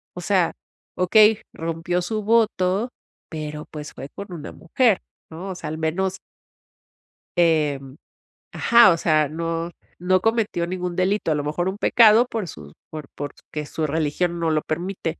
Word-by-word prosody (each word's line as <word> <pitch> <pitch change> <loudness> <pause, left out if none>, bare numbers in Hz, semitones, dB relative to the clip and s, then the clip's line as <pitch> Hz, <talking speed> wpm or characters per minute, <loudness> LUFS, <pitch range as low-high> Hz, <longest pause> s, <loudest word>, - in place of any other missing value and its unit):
o 180 - -6
sea, 185 -2 +2 0.5
okey, 210 +4 +5
rompió 165 +2 -2
su 215 +4 -2
voto, 215 -1 +2 0.4
pero 150 -1 -6
pues 150 -1 -8
fue 135 +2 -8
con 200 -1 -8
una 150 -3 -7
mujer", 220 +4 +1 0.3
¿no?, 175 +5 -7
o - - -6
sea, 175 - -6
al 155 - -4
menos 185 +4 -1 1.2
Em, 150 -5 +1 0.6
ajá, 235 -5 +6
o 165 - +1
sea, 155 -3 +2
no 165 +2 -3 0.3
no 185 +1 +2
cometió 220 -5 0
ningún 180 -1 -4
delito, 185 -1 +1
a - - +2
lo 145 - -2
mejor 175 +5 -1
un 190 - -5
pecado 225 +2 +5
por 220 -7 -4
sus 75 - -11 0.2
por 155 -3 -8
porque 145 +1 -6
su 155 +1 -3
religión 160 +3 -1
no 165 -1 +1
lo 155 -1 +1
permite. 170 +1 -4
175 Hz, 160 wpm, -23 LUFS, 155-190 Hz, 1.2 s, ajá